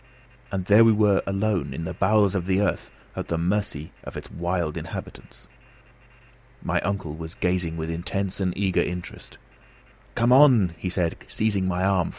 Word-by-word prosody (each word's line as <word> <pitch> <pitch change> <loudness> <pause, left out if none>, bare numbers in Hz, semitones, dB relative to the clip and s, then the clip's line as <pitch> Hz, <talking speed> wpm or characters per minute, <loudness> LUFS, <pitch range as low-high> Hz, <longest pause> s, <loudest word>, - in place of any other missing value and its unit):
And 95 -3 -2
there 105 +3 +7
we 115 - +6
were 105 -2 +3
alone, 100 -8 -1
in 85 - -4
the - - -4
bowels 100 0 +3
of 95 -2 -2
the 95 0 +2
earth, 105 - -1 0.3
at - - -4
the 85 - -1
mercy 85 -3 -2
of - - -8
its - - -9
wild 85 -2 -2
inhabitants! - - -8 1.2
My - - 0
uncle 95 -6 -3
was 80 +1 -8
gazing 90 -2 -1
with 80 0 -3
intense 95 +4 -3
and 95 -2 0
eager 95 -2 +1
interest. 90 0 -6 0.8
"Come 120 +1 +2
on!" 125 - +6 0.2
said 90 -2 -1
he, - - -17
seizing 100 -4 0
my 90 0 -1
arm. 95 -3 +2
95 Hz, 165 wpm, -24 LUFS, 85-100 Hz, 1.2 s, there